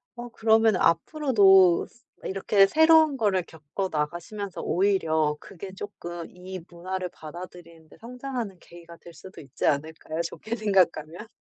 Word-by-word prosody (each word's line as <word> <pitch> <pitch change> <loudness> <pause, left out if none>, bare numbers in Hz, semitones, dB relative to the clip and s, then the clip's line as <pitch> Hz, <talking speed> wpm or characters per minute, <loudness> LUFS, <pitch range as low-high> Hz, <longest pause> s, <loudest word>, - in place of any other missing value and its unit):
어 240 0 -8
그러면은 220 -2 +3
앞으로도 195 - +4
스 240 - -27 0.2
이렇게 195 +1 +3
새로운 320 +2 +5
거를 205 -7 +1
겪어 160 +4 -6
나가시면서 175 +6 -4
오히려 160 -6 +1
그게 190 +1 -10
쪼끔 175 -4 -7
이 185 +1 -8
문화를 185 +2 -5
받아들이는 170 0 -11
데 - - -18
성장하는 245 -4 -6
계기가 170 -1 -14
될 170 - -14
수도 185 +3 -13
있지 140 -2 -6
않을까요, 155 +2 -2
좋게 215 +7 -5
생각하면? 185 -3 0
185 Hz, 335 characters per minute, -26 LUFS, 170-215 Hz, 0.2 s, 새로운